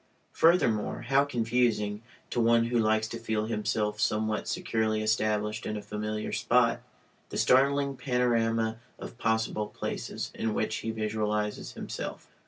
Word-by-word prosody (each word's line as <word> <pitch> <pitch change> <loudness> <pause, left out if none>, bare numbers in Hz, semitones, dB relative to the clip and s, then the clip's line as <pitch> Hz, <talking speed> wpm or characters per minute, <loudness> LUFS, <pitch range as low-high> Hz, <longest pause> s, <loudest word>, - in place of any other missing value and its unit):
Furthermore, 160 -11 +3
how 135 +1 +4
confusing 115 -5 0 0.3
(to 120 - +1
one 115 0 +4
who 120 0 +1
likes 110 0 +2
to 115 - -5
feel 110 -2 -1
himself 105 -1 -1
somewhat 110 -1 0
securely 110 -1 0
established 105 -1 0
in 105 - -3
a - - -5
familiar 105 +1 -3
spot) - - +2 0.5
the - - -5
startling 140 +1 +3
panorama 115 -3 +1 0.2
of 115 - -9
possible 110 -1 0
places - - -5
in 110 -1 -2
which 110 - -1
he 115 - -4
visualizes 105 -1 -2
himself. - - -6
110 Hz, 135 wpm, -29 LUFS, 105-115 Hz, 0.5 s, how